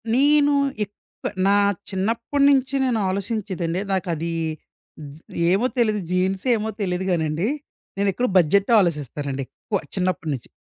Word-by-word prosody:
నేను 290 +2 +5 0.3
ఏప్ 205 0 -9 0.5
నా 200 - +4 0.3
చిన్నప్పటినుంచి 260 +7 +2
నేను 240 -4 +1
ఆలోచించేదండి 190 -3 -2
నాకది 170 -3 -2 1.2
ఏమో 200 +6 +2
తెలియదు 215 -4 +2
జీన్స్ 185 +2 0
ఏమో 220 0 -2
తెలీదు 185 -1 -1
కానండి. 160 +3 0 0.5
నేను 200 0 +2
ఎక్కడ 250 +5 0
బడ్జెట్టే 195 +6 +3
ఆలోసిస్తానండి 145 -5 -2
ఎక్కువ 200 - -4 0.2
చిన్నప్పటి 185 -4 -1
నుంచి. 125 -4 -7
195 Hz, 115 wpm, -23 LUFS, 170-230 Hz, 1.2 s, నేను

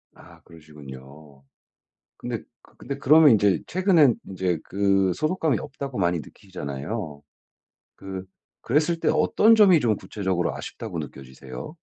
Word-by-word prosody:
아 - - -17
그러시군요. 70 -3 -14 0.7
근데 - - -5 0.3
근데 140 - -6
그러면 150 +1 +6
인제 100 -5 +2
최근에 175 - +4
인제 90 -3 -2
그 95 -1 +1
소속감이 155 - 0
없다고 135 -2 -7
많이 85 -2 +1
느끼시잖아요. 75 -1 -7 0.7
그 95 -1 -8 0.4
그랬을 155 +5 0
때 - - 0
어떤 225 +2 +4
점이 190 -7 +6
좀 110 -5 +1
구체적으로 95 -5 -3
아쉽다고 - - -7
느껴지세요? 65 - -9
95 Hz, 305 characters per minute, -24 LUFS, -, 0.7 s, 그러면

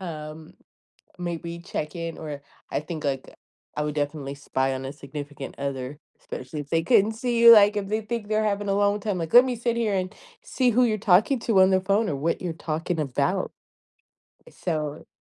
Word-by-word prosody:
um, 155 -3 -8 0.6
m 180 - -6
maybe 170 0 -4
check 150 -3 -5
in 165 -1 -4
or 150 -2 -6 0.3
I - - 0
think, 155 0 -7
like, 135 -2 -2 0.4
I 150 - 0
would 150 0 -2
definitely 145 -1 -3
spy 135 -1 -1
on 130 0 -5
a 135 - -5
significant 145 -1 -8
other, 140 0 -4 0.2
especially 130 +4 -6
if 145 - -9
they 165 0 +2
couldn't 215 +3 +4
see 235 +1 -1
you, 235 0 +10
like, 210 -1 +7
if 200 -1 -2
they 215 +2 0
think 215 -1 -4
they're 215 0 +1
having 205 -1 -1
a 195 - +2
long 205 +1 +2
time, 205 -2 -2
like, 165 -2 -4
let 245 +1 +10
me 255 -1 -1
sit 235 0 -1
here 225 -3 0
and 185 -1 -2 0.3
see 255 -2 +1
who 245 +2 +4
you're 215 -3 +1
talking 210 +6 +4
to 220 -4 +3
on 190 0 +6
the 190 0 +3
phone 200 +3 +1
or 145 - -1
what 160 +5 -1
you're 175 -2 -2
talking 165 +2 -3
about 135 -4 -1 1.0
so... 155 -3 -4
170 Hz, 205 wpm, -25 LUFS, 150-210 Hz, 1.0 s, you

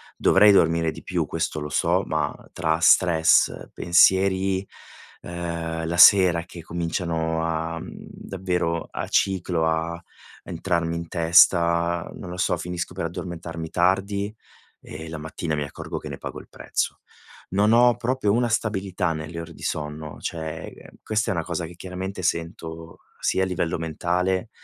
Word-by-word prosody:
Dovrei 105 0 +6
dormire 80 -2 +3
di - - -11
più, - - -1
questo 80 - -2
lo 75 - -4
so, - - +1
ma - - -1 0.2
tra 80 -1 0
stress, 85 -2 +4
pensieri, 95 +2 +3 0.6
uhm, 85 -1 -4
la 85 +1 -2
sera 90 -3 +7
che 85 -1 -10
cominciano 80 -1 -2
a 80 0 -2
mhmm, - - -8 0.2
davvero 90 -3 -2
a - - -5
ciclo, 90 -4 +1
a 85 +1 -1 0.4
entrarmi 85 -1 -2
in 85 -1 -5
testa, 85 0 +4
non 90 - -8
lo 90 - -6
so, 95 - +1
finisco 90 0 -4
per 95 - -4
addormentarmi 85 -1 -6
tardi 100 +3 0 0.5
e 80 +1 -9
la 80 - -6
mattina 80 +1 -4
mi 75 - -1
accorgo 70 - -6
che - - -9
ne - - -6
pago - - -7
il - - -14
prezzo. - - -3 0.5
Non 105 +3 +3
ho 120 0 +5
proprio 120 -4 0
una 120 +2 +2
stabilità 95 -6 -1
nelle 80 +2 -6
ore 85 0 -9
di - - -16
sonno, 75 0 -4
cioè, 80 -2 -6
questa 110 +1 0
è - - +1
una 85 -2 -2
cosa 85 -1 -3
che 85 +1 -11
chiaramente 95 +1 -6
sento 85 0 -4 0.2
sia 95 - +1
a - - +2
livello 85 -3 -1
mentale, 90 +5 -1
85 Hz, 155 wpm, -24 LUFS, 80-95 Hz, 0.6 s, sera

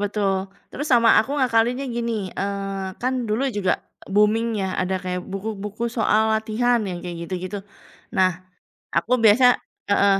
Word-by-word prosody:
Betul, 195 -2 0 0.2
terus 290 +2 -4
sama 235 -2 +6
aku 275 +6 -3
ngakalinnya 245 0 +2
gini, 235 -6 -3
eee, 195 -1 -3
kan 255 -2 -2
dulu 220 +6 0
juga 200 -3 0 0.2
booming 215 +3 +2
ya 190 -2 -2
ada 185 +1 0
kayak 180 -1 -3
buku-buku 210 +3 -4
soal 220 -1 +2
latihan 225 +2 +1
yang 180 -1 -6
kayak 170 -1 -6
gitu-gitu. 185 +2 -4 0.6
Nah 185 0 +1 0.4
aku 250 - +2
biasa 245 +4 +6 0.3
heeh, 200 -1 +4
210 Hz, 140 wpm, -23 LUFS, 190-235 Hz, 0.6 s, sama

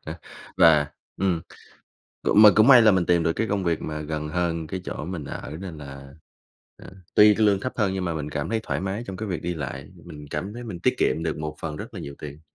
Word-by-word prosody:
Ờ, - - -5 0.4
và 75 -3 +5 0.3
ừm, 90 -3 0 0.8
cũng 105 - +5
mà 105 - +10
cũng 110 +5 +6
may 130 -3 +9
là 110 - +7
mình 95 -2 +1
tìm 85 -1 +3
được 80 0 +1
cái 115 - -1
công 100 -1 -1
việc 85 -2 0
mà 75 -1 -4
gần 75 0 -4
hơn 85 -1 -2
cái 95 +4 -5
chỗ - - -5
mình 85 -3 -5
ở, - - -7
nên 90 -5 -7
là, 70 -1 -10 0.6
ờ, - - -13 0.2
tuy 105 0 +7
cái 110 0 +2
lương 100 -2 +3
thấp 130 - -3
hơn, 100 -4 +1
nhưng 95 -1 -2
mà 85 -2 -2
mình 75 -1 -4
cảm 75 +1 -3
thấy 115 -1 0
thoải - - -3
mái 95 +5 -3
trong 95 - -6
cái 110 -1 -4
việc 90 - -3
đi 90 +1 -2
lại, 75 -5 -6 0.2
mình 75 -3 -10
cảm 100 +3 -4
thấy 120 +1 -7
mình 100 -7 -7
tiết - - +2
kiệm 80 - +1
được 80 -2 -2
một 75 0 -5
phần 75 -2 -5
rất - - -8
là - - -6
nhiều 70 - -7
tiền, 75 +1 -9
85 Hz, 260 wpm, -24 LUFS, 75-100 Hz, 0.8 s, mà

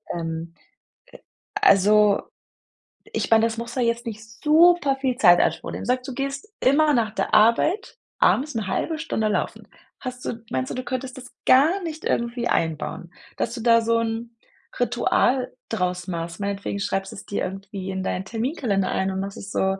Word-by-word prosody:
Ähm, 165 0 -4 1.1
also, 210 - +5 0.8
ich 430 +1 -3
meine, 225 0 +6
das 230 0 -2
muss 235 +1 -5
da 255 - -1
jetzt 235 0 0
nicht 220 -1 -6 0.2
super 315 -2 +5
viel 260 -2 -1
Zeit 175 -8 +6
in - - +5
Anspruch - - -3
nehmen. - - -6
Sage 250 +1 +1
du 265 - -5
gehst 275 +6 -4
immer 295 +3 +4
nach 230 -4 +1
der - - -2
Arbeit 235 - +3 0.2
abends 295 +3 +3
'ne 220 -3 -2
halbe 315 +10 -2
Stunde 265 -9 -1
laufen. 210 - -2 0.3
Hast 250 -1 -7
du 230 -1 -5
meinst 130 0 -1
du, - - -4
du 255 - -4
könntest 255 0 -4
das 255 - -11
gar 315 +9 +5
nicht 320 -1 -6
irgendwie 235 0 -1
einbauen, 165 +1 -2 0.3
dass 235 - -2
du 235 - -6
da 230 0 +5
so 230 0 +2
'n 230 +1 -3 0.4
Ritual 245 +1 +1 0.2
draus 180 -4 -2
machst? 170 -1 -5
Meinetwegen 200 0 -3
schreibst 195 0 -2
es 200 - -10
dir 200 - -3
irgendwie 195 0 -6
in 190 0 -3
deinen 185 0 -2
Terminkalender 225 - -1
ein 190 0 0
und 190 - -3
machst 195 0 -6
es 200 - -8
so 190 0 +1
230 Hz, 180 wpm, -23 LUFS, 195-260 Hz, 1.1 s, meine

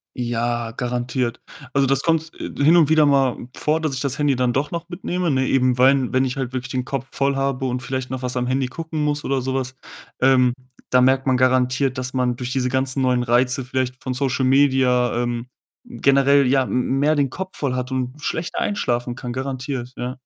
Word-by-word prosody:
Ja, 120 -1 -2
garantiert. 125 0 -2 0.3
Also 135 0 +3
das 135 0 +2
kommt, 165 0 0
äh, - - -5
hin 160 +4 +6
und 160 -4 +5
wieder 155 -1 +5
mal 135 -3 +3 0.2
vor, 155 +1 0
dass 155 -3 -1
ich 130 - -3
das 140 -2 -2
Handy 145 -3 +2
dann 125 -1 +1
doch 140 +2 -1
noch 170 0 -5
mitnehme, 180 0 -2
ne? 130 -2 +1
Eben 130 -1 +2
weil, 130 0 +4
wenn 130 0 +2
ich 130 +1 -3
halt 130 -2 -3
wirklich 125 -1 -4
den 125 -1 -2
Kopf 135 -1 -4
voll 140 0 0
habe 135 -1 -1
und 125 0 -2
vielleicht 130 0 -4
noch 130 -1 -4
was 125 0 -3
am 125 0 -1
Handy 130 0 0
gucken 160 +2 -4
muss 150 0 -1
oder 135 -1 0
so 130 +1 -2
was, 130 -1 -3 0.5
ähm, 125 -1 +4 0.4
da 125 - +4
merkt 130 +1 +3
man 130 - +3
garantiert, 130 +1 +2
dass 130 0 -3
man 125 -1 0
durch 125 0 -5
diese 130 -1 0
ganzen 130 +1 -1
neuen 125 -1 +2
Reize 125 +2 +1
vielleicht 130 0 -3
von 130 - -3
Social 130 0 0
Media, 130 -2 +3
ähm, 120 0 -3 0.4
generell, 140 +2 +3
ja, 135 +1 +3
m 125 +2 -1
mehr 150 +2 +3
den 140 -2 +1
Kopf 190 +7 -7
voll 135 -3 -1
hat 125 +1 -3
und 130 +2 -3
schlechter 160 +1 -3
einschlafen 120 -11 -1
kann. 125 -1 -6
Garantiert, 130 -1 -4
ja. 125 +1 -4
130 Hz, 215 wpm, -21 LUFS, 125-140 Hz, 0.5 s, hin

